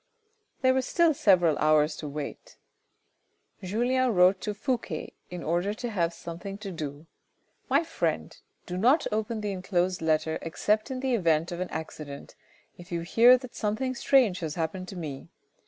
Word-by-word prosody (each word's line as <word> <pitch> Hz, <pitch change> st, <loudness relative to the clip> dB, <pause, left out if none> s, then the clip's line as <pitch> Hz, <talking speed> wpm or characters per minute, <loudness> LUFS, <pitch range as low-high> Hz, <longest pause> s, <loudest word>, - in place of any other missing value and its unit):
There 260 Hz, 0 st, +5 dB
was 260 Hz, -1 st, 0 dB
still 340 Hz, -2 st, +3 dB
several 175 Hz, -, +3 dB
hours 155 Hz, 0 st, +3 dB
to 150 Hz, -, -6 dB
wait. 145 Hz, 0 st, -7 dB, 1.0 s
Julien 245 Hz, +5 st, +1 dB
wrote 180 Hz, +1 st, +5 dB
to 210 Hz, -1 st, -3 dB
Fouque 220 Hz, -, -3 dB, 0.2 s
in 180 Hz, -1 st, -6 dB
order 175 Hz, +6 st, 0 dB
to 240 Hz, +1 st, -4 dB
have 170 Hz, -5 st, 0 dB
something 175 Hz, +4 st, -7 dB
to 200 Hz, -2 st, -7 dB
do. 150 Hz, -2 st, -6 dB, 0.3 s
" -, -, -42 dB
My -, -, +4 dB
friend, 330 Hz, -, -2 dB, 0.3 s
do 180 Hz, -, -5 dB
not 260 Hz, -, +4 dB
open 220 Hz, +1 st, -2 dB
the 205 Hz, -1 st, -2 dB
enclosed 185 Hz, -1 st, -1 dB
letter 160 Hz, 0 st, +1 dB
except 210 Hz, -, 0 dB
in 260 Hz, -1 st, -4 dB
the 265 Hz, -1 st, 0 dB
event 165 Hz, -6 st, +2 dB
of 175 Hz, -, -5 dB
an 185 Hz, -, -3 dB
accident, 150 Hz, -3 st, -7 dB, 0.5 s
if 175 Hz, +1 st, -13 dB
you 170 Hz, -1 st, -1 dB
hear 235 Hz, +8 st, +6 dB
that 255 Hz, -1 st, -10 dB
something 230 Hz, +5 st, -1 dB
strange 245 Hz, -6 st, +3 dB
has 160 Hz, -3 st, -4 dB
happened 175 Hz, +3 st, -3 dB
to 195 Hz, -, -8 dB
me. 150 Hz, -6 st, -6 dB
185 Hz, 170 wpm, -28 LUFS, 165-235 Hz, 1.0 s, hear